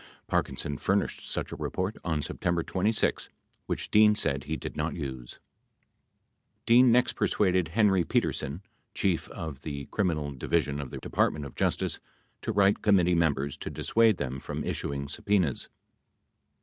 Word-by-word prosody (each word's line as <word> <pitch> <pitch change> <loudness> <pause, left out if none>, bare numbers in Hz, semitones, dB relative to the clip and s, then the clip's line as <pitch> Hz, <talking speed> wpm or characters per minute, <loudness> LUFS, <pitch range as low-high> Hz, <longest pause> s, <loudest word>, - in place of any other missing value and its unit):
Parkinson 70 0 -2
furnished - - -1
such - - -3
a - - -4
report 95 +4 -3
on 80 -4 -1
September 85 +3 -1
26, 105 +6 0 0.4
which - - -3
Dean 105 0 +6
said 70 -9 -1
he 80 +1 -2
did - - -7
not 75 +2 -2
use. 65 -6 -6 1.3
Dean 120 +1 +6
next 125 +1 +3
persuaded 95 -4 +1
Henry 95 0 +3
Petersen, 75 +2 -1 0.3
Chief 90 -4 0
of 75 -4 -7
the 70 -2 -5
Criminal 80 -8 0
Divi 80 +5 +1
sion 70 -1 -4
of 70 - -7
the - - -7
Department 75 -2 0
of 70 - -9
Justice, - - -1 0.4
to - - -2
write 100 0 +3
committee 90 -4 +4
members 70 -5 +1
to - - -6
dissuade 115 -3 +2
them 65 -1 -3
from - - -5
issuing 70 0 -3
subpenas. 90 -2 0
85 Hz, 150 wpm, -28 LUFS, 70-100 Hz, 1.3 s, Dean